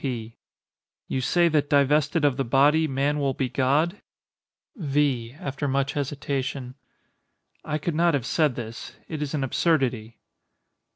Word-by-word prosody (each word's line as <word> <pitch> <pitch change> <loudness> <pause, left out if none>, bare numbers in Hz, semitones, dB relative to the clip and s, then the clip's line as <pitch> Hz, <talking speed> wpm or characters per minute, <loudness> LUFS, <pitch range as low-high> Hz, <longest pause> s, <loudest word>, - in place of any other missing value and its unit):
P. 115 -4 -4 0.7
You 130 - -2
say 175 +6 +3
that 150 -2 +1
divested 150 +2 +3
of 140 -3 +3
the 135 - -1
body 145 +6 +3
man 140 +2 0
will 135 -2 0
be 130 -2 -1
God? 150 - +1 0.7
V. 140 - 0
[After 145 0 -4
much 135 0 0
hesitation.] 140 -2 -3 0.9
I 150 - -2
could 160 +2 -3
not 170 0 +3
have 130 -5 -2
said 150 -4 +1
this; 115 -1 -7
it 155 -2 -5
is 150 0 -2
an 140 - -1
absurdity. 130 -6 0
140 Hz, 140 wpm, -25 LUFS, 130-150 Hz, 0.9 s, say